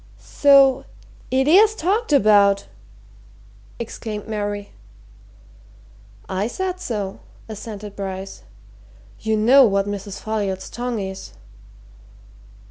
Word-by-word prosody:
"So 275 -2 +4 0.4
it 265 +1 +1
is 415 +7 +5
talked 410 +3 -1
about!" 200 -6 +4 1.1
exclaimed 220 -2 -6
Mary. 205 -1 -4 1.6
"I 190 +3 -2
said 370 +8 -4
so," 210 - -4 0.3
assented 210 -1 -8
Bryce. 195 -1 -6 0.8
"You 220 0 -1
know 255 +6 +6
what 200 -4 +2
Mrs. 200 -1 -6
Folliot's 200 -4 -3
tongue 245 -1 -3
is." 190 -1 -7
215 Hz, 90 wpm, -21 LUFS, 200-265 Hz, 1.6 s, know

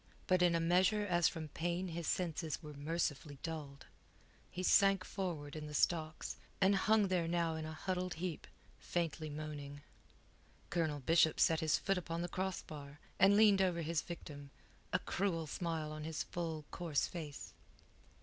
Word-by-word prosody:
But 185 -1 +3
in 175 -1 +5
a - - +3
measure 185 +5 +3
as 175 -3 +3
from 155 -2 -4
pain 175 +4 -2
his 170 -1 -4
senses 165 -3 -1
were 150 -1 -8
mercifully 145 -1 -2
dulled, 150 -4 -6 0.6
he 185 0 -5
sank 195 0 +5
forward 160 -7 -4
in 155 -1 -5
the 150 - -6
stocks, 155 0 0 0.2
and 195 +1 +5
hung 210 +1 +4
there 175 -3 +1
now 170 -1 +1
in 160 0 -4
a 155 - -5
huddled 180 +2 -2
heap, 170 -1 -4 0.3
faintly 165 -2 -2
moaning. 145 -1 -6 0.9
Colonel 160 -4 0
Bishop 160 +2 +4
set 160 -1 +4
his 160 -2 +2
foot 195 -2 0
upon 170 -1 -3
the - - -1
crossbar, 155 -6 -5 0.2
and 200 +1 +7
leaned 210 -3 +6
over 175 -3 +1
his 160 0 0
victim, 145 -4 -8 0.4
a - - +3
cruel 175 -4 -1
smile 160 0 -3
on 155 0 -6
his 160 0 -2
full, 165 -3 -4
coarse 165 -5 0
face. 155 -5 -7
165 Hz, 160 wpm, -36 LUFS, 155-180 Hz, 0.9 s, and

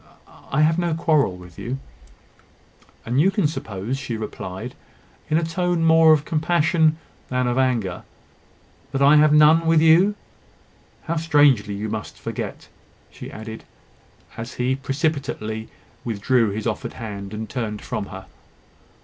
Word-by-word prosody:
I 135 - +2
have 160 +2 +3
no 170 -2 0
quarrel 155 - +1
with 90 -2 -13
you." 125 +3 -4 1.3
"And 120 +3 -1
can 200 - -1
you - - +4
suppose," 115 - -4
she 120 -4 -4
replied, 105 +1 -6 0.6
in 155 - +3
a 170 - +1
tone 170 0 0
more 160 0 +6
of 150 -1 +3
compassion 160 -1 +2 0.3
than 125 0 0
of 125 +1 0
anger, 120 -8 0 0.9
"that 135 0 +1
I 145 +2 +7
have 150 0 +5
none 155 +2 +5
with 165 -1 +5
you? 170 +6 +5 0.9
How 170 0 -2
strangely 145 -10 +3
you 105 +2 -4
must 110 0 -5
forget!" - - -6 0.4
she - - -10
added, 110 0 -8 0.7
as 115 +2 -7
he 125 +2 0
precipitately 135 -6 -3 0.3
withdrew 115 +1 +1
his 105 +2 -4
offered 110 -3 -3
hand, 100 -4 -7
and 110 +1 -5
turned 105 -4 -4
from 100 - -4
her. 95 0 -9
130 Hz, 140 wpm, -22 LUFS, 110-160 Hz, 1.3 s, I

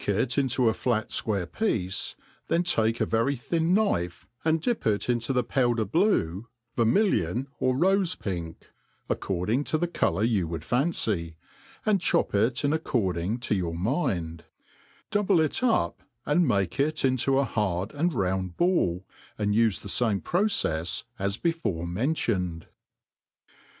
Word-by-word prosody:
it 110 +5 +1
into 130 -3 +2
a 110 - +4
flat 110 -2 -1
fquire 100 -5 -1
picce^ 100 - -2 0.3
then 170 - +2
take 115 -9 +1
a - - +2
very 115 +5 +1
thin 165 +7 -1
knife, 180 - +1 0.2
and 160 0 +2
dip 235 - -1
it 105 -2 +1
into 120 +1 0
the 125 -2 +2
powder 120 -2 +1
blue, 110 - +1 0.3
vermillion, 120 - +2
or 130 0 +2
rofe 185 +4 +2
pink 85 -4 -5 0.4
(according 100 +9 0
to 155 - 0
the 175 - 0
colour 105 - 0
you 105 -7 +1
would 80 0 -5
fancy), 110 - 0 0.5
and 205 -4 +2
chop - - +1
it 115 +6 +1
in 145 - +2
ac^ 160 +1 0
cording 95 -1 -1
to 120 - -1
your 85 -4 -1
mind; 85 - -1 0.7
double 205 -4 +3
it 155 -2 0
up, 245 -3 +1 0.2
and 160 +3 +3
make 100 +2 0
it 150 +1 +1
into 130 +1 +2
a 140 - +4
hard 100 -4 -1
and 165 +4 +1
round 95 -3 -1
ball, 95 - +1 0.3
and 105 -1 0
ufe 110 -2 +3
the - - -8
fame 105 -1 +1
procefs 90 - 0 0.2
as 100 +1 -1
before 165 - -1
mentioned. 90 - -1
115 Hz, 150 wpm, -27 LUFS, 95-155 Hz, 0.7 s, a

